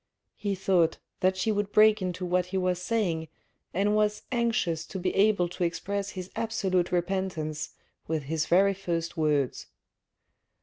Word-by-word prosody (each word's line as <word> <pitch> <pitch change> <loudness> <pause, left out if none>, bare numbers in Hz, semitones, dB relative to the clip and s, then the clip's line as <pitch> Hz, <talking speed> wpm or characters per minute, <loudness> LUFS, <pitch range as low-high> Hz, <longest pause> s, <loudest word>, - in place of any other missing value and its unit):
He 200 -1 -2
thought 180 -4 +2 0.2
that 185 0 +2
she 220 +4 +1
would 205 -1 -1
break 215 -1 +5
into 185 0 -3
what 180 0 +1
he 190 +1 -2
was 180 -1 0
saying 180 -6 0 0.4
and 200 +3 +1
was 210 0 +1
anxious 230 -10 0
to - - -6
be 185 0 -1
able 200 -3 +3
to 180 - -3
express 200 +4 -2
his 185 0 -6
absolute 195 -6 0
repentance 175 -4 -1 0.4
with 160 -2 -1
his 155 +3 -1
very 195 +3 +4
first 170 -3 -3
words. 150 -5 0
185 Hz, 150 wpm, -28 LUFS, 170-200 Hz, 0.4 s, break